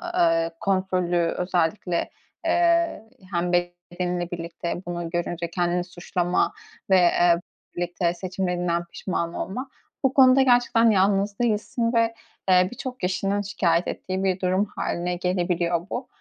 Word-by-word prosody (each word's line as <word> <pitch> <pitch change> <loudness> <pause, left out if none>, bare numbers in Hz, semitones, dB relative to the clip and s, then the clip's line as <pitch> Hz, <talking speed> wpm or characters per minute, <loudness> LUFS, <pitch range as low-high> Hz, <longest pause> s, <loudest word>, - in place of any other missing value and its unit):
ııı, 165 0 +3
kontrolü 185 -2 0 0.2
özellikle, 180 0 0 0.4
ııı, 340 -5 +2 0.3
hem 175 +1 0
bedeninle 175 0 -2
birlikte 170 0 -4
bunu 175 -1 -4
görünce 175 0 -3
kendini 175 0 0
suçlama 175 0 -1 0.4
ve, 180 -2 +5 0.2
ııı, 170 +1 +2 0.3
birlikte 175 0 -1
seçimlerinden 180 -2 -2
pişman 170 -1 -3
olma, 255 +8 -4 0.3
bu 265 0 +2
konuda 265 0 +6
gerçekten 245 -2 +4
yalnız 200 +1 +2
değilsin 230 +1 0
ve, 230 0 +2 0.4
ııı, 180 0 +5
birçok 255 0 -6
kişinin 195 +2 0
şikâyet 180 -4 +1
ettiği 190 +1 -3
bir 190 -1 +1
durum 185 +2 +1
hâline 175 +1 -2
gelebiliyor 175 -1 0
bu. 250 +2 -4
180 Hz, 120 wpm, -24 LUFS, 175-200 Hz, 0.4 s, konuda